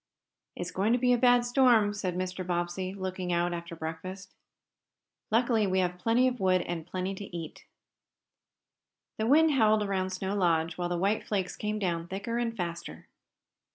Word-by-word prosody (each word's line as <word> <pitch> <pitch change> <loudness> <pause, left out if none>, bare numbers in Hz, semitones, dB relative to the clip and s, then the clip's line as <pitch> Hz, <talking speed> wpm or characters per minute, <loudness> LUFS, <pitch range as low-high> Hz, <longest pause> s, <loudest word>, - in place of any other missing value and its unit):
"It's 175 0 -5
going 205 +5 +1
to - - +4
be 250 0 +3
a - - +3
bad 245 0 +5
storm," 245 -5 +4
said 185 -4 -3
Mr. 185 0 -3
Bobbsey, 175 +1 -2
looking 185 -2 -4
out 175 0 +1
after 170 0 -6
breakfast. 185 +4 -7 1.0
"Luckily 225 -2 +2
we 190 0 0
have 180 -1 0
plenty 230 +6 +3
of 250 -1 -2
wood 185 -1 +2
and 170 -1 -5
plenty 185 +1 -3
to 200 +1 -7
eat." 165 -2 -8 1.5
The 220 - 0
wind 315 +4 +5
howled 215 -5 +3
around 190 -2 -1
Snow 190 +1 -3
Lodge 165 -3 +1
while 175 0 -2
the 175 - -1
white 200 +5 +1
flakes 190 -4 -2
came 210 0 -3
down 170 -4 -2
thicker 200 +6 -3
and 230 -1 -2
faster. 170 -2 -6
190 Hz, 170 wpm, -29 LUFS, 175-220 Hz, 1.5 s, bad